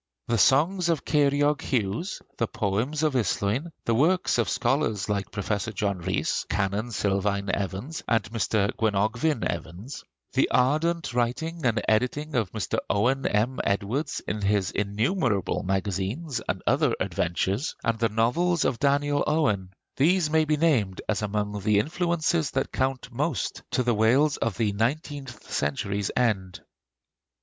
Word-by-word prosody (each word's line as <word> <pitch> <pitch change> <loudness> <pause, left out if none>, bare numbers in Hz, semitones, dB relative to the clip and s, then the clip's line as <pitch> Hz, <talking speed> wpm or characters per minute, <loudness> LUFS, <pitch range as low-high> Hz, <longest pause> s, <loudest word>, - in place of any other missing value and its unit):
The 115 - +1
songs 170 - +3
of 165 -3 0
Ceiriog 145 0 +2
Hughes, 120 - -2 0.2
the 115 - +1
poems 110 +12 -1
of 155 -2 +2
Islwyn, 125 - 0
the 115 - +2
works 160 +3 +2
of 115 - +1
scholars 120 -6 0
like 100 -2 -1
Professor 105 +1 -2
John 100 -2 -1
Rhys, 85 - -1
Canon 105 +2 0
Silvain 100 -1 0
Evans, 100 - -3
and 115 -1 +2
Mr. 110 -3 +1
Gwenogfvyn 110 +6 +1
Evans; 90 - -5 0.3
the - - +2
ardent 155 +7 +1
writing 130 +8 -1
and 110 -3 +1
editing 125 +8 +1
of 110 -8 0
Mr. 110 -4 -2
Owen 125 +7 +2
M. 115 +5 0
Edwards 100 +9 -1
in 105 0 -2
his 100 -2 +1
innumerable 105 - 0
magazines 100 - -2
and - - -2
other - - +2
adventures; 95 - -1
and 115 -1 0
the 115 -1 +2
novels 145 +11 +1
of 120 - 0
Daniel 145 0 +2
Owen, 105 -12 +1 0.3
these 160 +2 +3
may 160 0 +3
be 155 0 +1
named 125 - +2
as 110 - 0
among 105 0 -2
the 105 +1 +3
influences 165 - +1
that 135 - -2
count 130 -1 -1
most 135 - -2
to 125 - +1
the 120 -1 +2
Wales 125 +8 +3
of 115 -4 -2
the 110 -3 +1
nineteenth 130 +2 -3
century's 100 +8 -1
end. 100 -7 0
115 Hz, 145 wpm, -26 LUFS, 100-145 Hz, 0.3 s, songs